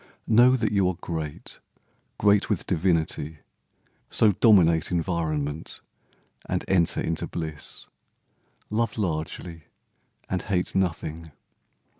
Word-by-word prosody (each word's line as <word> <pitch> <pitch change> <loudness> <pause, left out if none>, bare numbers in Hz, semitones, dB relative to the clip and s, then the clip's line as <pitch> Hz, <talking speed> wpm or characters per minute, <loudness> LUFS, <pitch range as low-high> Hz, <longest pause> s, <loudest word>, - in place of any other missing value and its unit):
Know 120 +3 +6
that 115 -4 0
you 100 -3 +2
are 90 - -3
great, 80 -3 -6 0.6
Great 100 -1 +3
with 105 -6 -1
divinity. 80 -3 0 0.7
So 110 - +4
dominate 90 -6 +4
Environment, 80 -4 -2 0.7
and - - -2
enter 85 -4 +2
into 80 0 -2
bliss. 80 -3 -4 0.9
Love 115 0 0
largely 85 -2 -4 0.6
and 95 - -2
hate 95 -4 -1
nothing. 80 -3 -2
85 Hz, 100 wpm, -25 LUFS, 80-100 Hz, 0.9 s, Know